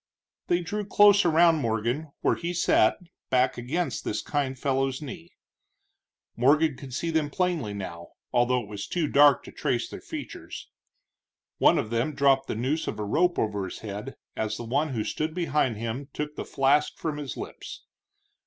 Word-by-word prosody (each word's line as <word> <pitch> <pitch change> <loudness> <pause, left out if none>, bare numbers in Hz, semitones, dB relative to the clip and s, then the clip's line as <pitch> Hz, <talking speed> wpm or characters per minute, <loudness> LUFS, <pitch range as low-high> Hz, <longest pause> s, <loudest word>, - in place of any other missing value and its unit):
They 175 0 +2
drew 210 +5 -3
close 205 0 +5
around 165 0 +5
Morgan 120 +4 -1
where - - +3
he 175 +1 -3
sat, 110 -9 +3 0.3
back 130 0 +3
against 160 +9 -2
this 105 - -2
kind 140 -3 -2
fellow's 135 0 0
knee. 165 +3 -8 1.1
Morgan 145 +4 +3
could 135 0 -10
see 165 +4 -2
them 155 -2 +1
plainly 165 - -1
now, 85 -4 -7 0.2
although 125 +1 +3
it - - -12
was 100 -1 -6
too 170 -4 -1
dark 145 -1 +5
to - - -11
trace - - -1
their - - -9
features. - - -8 0.9
One - - +5
of 110 - -2
them 120 +6 0
dropped 135 -1 +3
the - - -3
noose 135 +8 -1
of - - -3
a 105 - -3
rope 175 - +2
over 105 -2 -1
his 90 - -8
head 105 +5 -6 0.2
as 110 -1 -2
the - - -6
one 140 +7 0
who 115 -5 -2
stood 155 +6 -3
behind 150 -9 0
him 115 +5 -4
took 150 0 -4
the - - -5
flask 145 +2 +2
from 155 -2 -3
his 145 -4 -6
lips. - - -8
140 Hz, 175 wpm, -27 LUFS, 115-160 Hz, 1.1 s, close